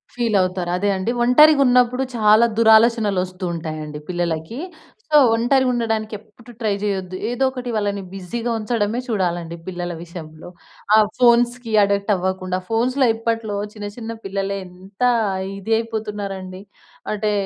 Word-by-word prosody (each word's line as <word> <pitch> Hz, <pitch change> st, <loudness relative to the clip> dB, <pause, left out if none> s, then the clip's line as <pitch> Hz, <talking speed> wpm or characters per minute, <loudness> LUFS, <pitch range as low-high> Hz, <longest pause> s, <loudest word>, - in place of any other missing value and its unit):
ఫీలవుతారు. 185 Hz, -7 st, 0 dB
అదే 200 Hz, +2 st, 0 dB
అండి. 190 Hz, +5 st, -1 dB
ఒంటరిగున్నప్పుడు 250 Hz, -2 st, +5 dB
చాలా 215 Hz, +1 st, +5 dB
దురాలోచనలొస్తుంటాయండి 185 Hz, -9 st, +1 dB
పిల్లలకి. 175 Hz, -, -3 dB, 0.5 s
So, 300 Hz, -, +7 dB, 0.2 s
ఒంటరిగుండడానికెప్పుడు 230 Hz, -2 st, -1 dB
try 215 Hz, -2 st, +1 dB
జెయొద్దు. 190 Hz, -3 st, -2 dB
ఏదో 245 Hz, +2 st, -1 dB
ఒకటి 250 Hz, -1 st, -6 dB
వాళ్ళని 205 Hz, -1 st, -1 dB
బిజీగా 225 Hz, +6 st, -4 dB
ఉంచడమే 220 Hz, +1 st, -1 dB
చూడాలండి 175 Hz, -7 st, -2 dB
పిల్లల 175 Hz, -1 st, -4 dB
విషయంలో. 165 Hz, -1 st, -10 dB, 0.5 s
ఆ -, -, +7 dB, 0.2 s
ఫోన్స్‌కి 240 Hz, -1 st, +3 dB
అడిక్టవ్వకుండా, 190 Hz, -2 st, 0 dB
ఫోన్స్‌లో 250 Hz, +4 st, +1 dB
ఇప్పట్లో 225 Hz, -2 st, -2 dB, 0.2 s
చిన్న 205 Hz, -1 st, -6 dB
చిన్న 230 Hz, -1 st, -6 dB
పిల్లలే 195 Hz, 0 st, -2 dB
ఎంతా 190 Hz, +7 st, -2 dB, 0.5 s
ఇది 200 Hz, +3 st, -6 dB
అయిపోతున్నారండి. 205 Hz, -4 st, -5 dB, 0.5 s
అంటే, 210 Hz, 0 st, -1 dB
210 Hz, 105 wpm, -21 LUFS, 185-235 Hz, 0.5 s, So